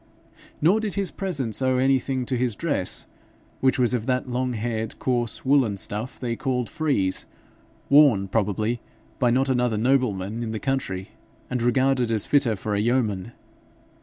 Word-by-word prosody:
Nor 185 +7 +5
did 215 -2 -3
his 195 -4 -1
presence 145 - -3
owe 130 -1 +2
anything 130 0 +1
to 130 - -1
his 120 -3 0
dress, 145 - -1 0.5
which 130 0 +2
was 125 -1 +2
of 120 -1 -1
that 130 0 0
long 125 0 -1
haired 110 -1 -3
coarse 120 -2 -1
woollen 130 -7 +3
stuff 105 +7 -3
they 120 -2 -2
called 125 -2 -2
frieze, 140 - 0 0.6
worn, 140 -9 +5
probably, 110 +3 0 0.4
by 125 -3 +3
not 130 +3 +2
another 125 -4 +1
nobleman 115 -4 0
in 115 -1 -3
the 110 - -3
country, 115 -9 -2 0.4
and 125 -1 -1
regarded 125 0 +2
as 110 -3 0
fitter 135 -6 +2
for 105 +2 -4
a 100 - +1
yeoman. 115 -2 0
125 Hz, 160 wpm, -24 LUFS, 110-135 Hz, 0.6 s, Nor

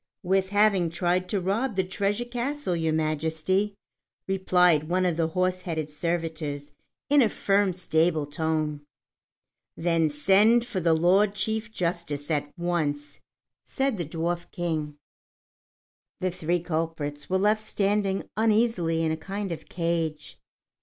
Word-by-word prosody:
"With 190 +1 +1
having 205 -4 +3
tried 180 +2 0
to 205 - 0
rob 205 +6 -1
the 190 - +2
treasure 200 +4 -1
castle, 245 -3 -2
Your 160 -1 0
Majesty," 160 +6 0 0.5
replied 180 -5 +3
one 185 +1 +2
of 175 -2 +1
the 165 -1 +1
horse 185 +2 0
headed 160 -4 -3
servitors 155 -3 -3 0.4
in 290 0 +5
a 230 - +4
firm, 200 -1 +2
stable 165 -3 +1
tone. 155 0 -2 1.0
"Then 165 -1 +2
send 200 +10 +4
for 240 -6 -3
the 165 -2 +3
Lord 195 +5 +3
Chief 220 +2 -2
Justice 170 -6 -3
at 145 -1 -1
once," 145 -4 -2 0.4
said 270 -4 -1
the 175 - -2
Dwarf 170 +3 -3
King. 155 -4 -3 1.2
The 185 0 0
three 175 0 -1
culprits 160 -3 -3
were 190 - +2
left 210 +3 +2
standing 200 -2 0
uneasily 215 -7 +2
in 160 - +1
a - - 0
kind 195 +4 -4
of 165 - -7
cage. 165 -3 -2
175 Hz, 135 wpm, -26 LUFS, 160-195 Hz, 1.2 s, in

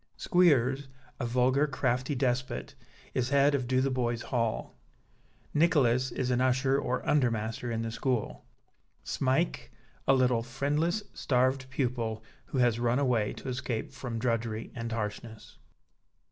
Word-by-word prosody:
Squeers, 140 -6 +3 0.3
a 120 - -1
vulgar, 130 +4 +2
crafty 130 0 -1
despot, 130 -1 -1 0.4
is 125 0 0
head 140 +1 +4
of 130 -3 0
Dotheboys 130 -2 0
Hall. 115 -3 -2 0.8
Nicholas 130 -6 +3
is 130 -1 -1
an 125 0 +2
usher 130 +1 +2
or 125 -2 -2
undermaster 115 -4 0
in 115 0 -2
the 115 - -3
school; 125 -1 -2 0.6
Smike, 135 +6 0 0.4
a 135 - +6
little, 125 -3 +3
friendless, 145 - -1
starved 130 0 +1
pupil 120 -4 -2 0.2
who - - -4
has 120 -2 +3
run 120 +1 +2
away 125 -6 +1
to - - -9
escape 125 -1 -3
from 125 -4 -5
drudgery 115 -1 -2
and 115 -1 -5
harshness.) 110 0 -5
125 Hz, 130 wpm, -29 LUFS, 115-135 Hz, 0.8 s, a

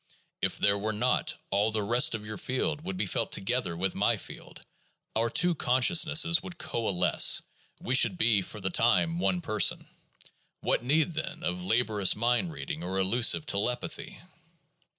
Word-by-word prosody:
If - - -1
there 100 0 +1
were 110 +1 -2
not, 120 +4 0 0.2
all 100 +3 +1
the 110 -1 -2
rest 120 +4 +3
of 105 -1 -8
your 110 0 -7
field 145 +4 -2
would 185 +1 -5
be - - -1
felt - - -3
together 100 -5 -1
with 95 +1 -1
my - - +1
field - - -10 0.3
— - - -46
our 115 +1 0
two 175 +7 +3
consciousnesses 165 +4 +3
would 175 -2 -10
coalesce, 110 - +2 0.4
we 125 - -3
should 180 +7 +4
be 115 - +2
for 105 +3 -9
the 95 -1 -2
time 165 - +1
one 180 0 0
person. 110 - +1 0.8
What - - 0
need, 155 +6 +1
then, 155 0 -6
of 90 +1 -3
laborious 105 0 +2
mind 120 - 0
reading 160 +1 -6
or 95 +2 -4
elusive 115 +10 +2
telepathy? 120 +3 -2
120 Hz, 165 wpm, -28 LUFS, 105-155 Hz, 0.8 s, should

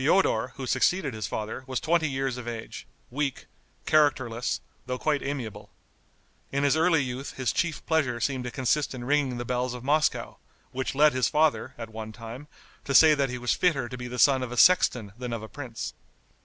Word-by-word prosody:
Feodor, 130 -7 +2
who 135 - -5
succeeded 150 +2 +1
his 110 -3 -4
father, 110 +5 -4
was 130 -1 -2
twenty 165 -1 +1
years 135 -1 -2
of 125 -2 -7
age, 115 -2 -7 0.2
weak, 140 0 -2 0.4
characterless, 130 -6 +2 0.3
though 125 0 -2
quite 150 +1 0
amiable. 135 -6 -5 0.8
In 140 +1 0
his 140 0 +3
early 165 -2 +3
youth 130 +2 -5
his 130 -4 0
chief 170 +5 -2
pleasure 140 -7 +1
seemed 130 0 -1
to - - -2
consist 135 +2 0
in 120 - -6
ringing 135 -1 +1
the 120 - -4
bells 125 0 -1
of 125 - -8
Moscow, 150 +3 +1 0.3
which 130 +1 -3
led 150 +1 +5
his 130 -6 +1
father, 155 0 +1
at 115 -2 -7
one 110 0 -7
time, 115 +5 -9 0.4
to 140 - -2
say 155 +1 +8
that 140 -3 +1
he 125 - -4
was 125 0 0
fitter 145 -9 +1
to 125 - -7
be 125 0 -6
the 125 0 -6
son 135 0 +5
of 125 -2 -4
a 125 - -5
sexton 120 - +4
than 125 -1 -4
of 115 -2 -4
a - - -7
prince. 125 -3 -6
130 Hz, 200 wpm, -27 LUFS, 120-145 Hz, 0.8 s, say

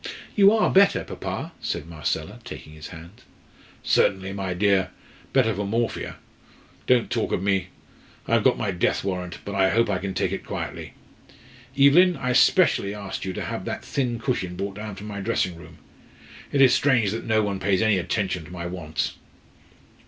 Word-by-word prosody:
"You 200 -1 +7
are 220 0 +3
better, 200 +1 +5
papa?" - - -5
said - - -3
Marcella, 80 -3 -4
taking 75 - -9
his 75 -1 -9
hand. 85 +4 -12 0.6
"Certainly, 95 0 +2
my 95 -2 -3
dear 95 -1 +2 0.4
better 120 -5 +3
for 100 +1 -3
morphia. 115 +2 -2 0.7
Don't 125 -2 +3
talk - - -1
of - - -1
me. 95 -2 +1 0.6
I - - -1
have - - +4
got - - +4
my 100 - -1
death 90 -2 0
warrant, 90 -3 -3
but 100 - -5
I 95 -1 +3
hope 115 0 +2
I 95 - 0
can 95 0 -4
take - - 0
it - - -4
quietly. - - -6 0.8
Evelyn, 160 +5 +6
I 125 -1 -1
specially 125 - +4
asked 100 -2 -6
to 95 - -3
have - - -5
that - - -5
thin 125 -4 -1
cushion 110 -7 -2
brought 100 +2 -4
down 105 -2 -6
from 100 - -9
my 105 -1 -6
dressing 90 -2 0
room. 85 - -13 0.7
It 140 - +2
is 130 -2 +7
strange 120 -8 +3
that 115 +2 -5
no 110 -1 +3
one 100 -2 -2
pays 95 +2 +1
any 110 -3 +3
attention 95 -2 -2
to 85 - -13
my 85 -1 -6
wants." 85 -4 -3
100 Hz, 180 wpm, -24 LUFS, 95-115 Hz, 0.8 s, You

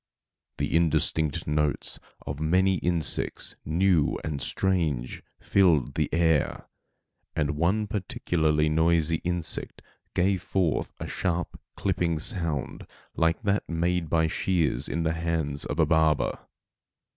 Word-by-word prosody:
The - - -1
indistinct 80 -2 +1
notes 75 -1 -1 0.3
of 70 0 -5
many 95 +4 +2
insects, 85 -3 -1
new 85 0 +2
and 75 -3 -3
strange, 80 -9 -1 0.2
filled 85 -10 +3
the - - -1
air, 80 -2 +1 0.7
and 75 -2 +1
one 85 +8 +1
particularly 80 -6 0
noisy 80 +1 +2
insect 85 -1 -2 0.3
gave 95 0 +2
forth 90 -5 0
a - - -4
sharp 90 -2 -2
clipping 85 -2 0
sound 85 - -2 0.3
like 80 +4 +1
that 100 0 0
made 85 0 0
by 80 -1 +3
shears 80 -5 0
in 85 +1 -1
the 80 0 +1
hands 80 -4 -2
of 75 - -4
a 80 - +5
barber. 80 -1 +1
80 Hz, 120 wpm, -27 LUFS, 75-90 Hz, 0.7 s, a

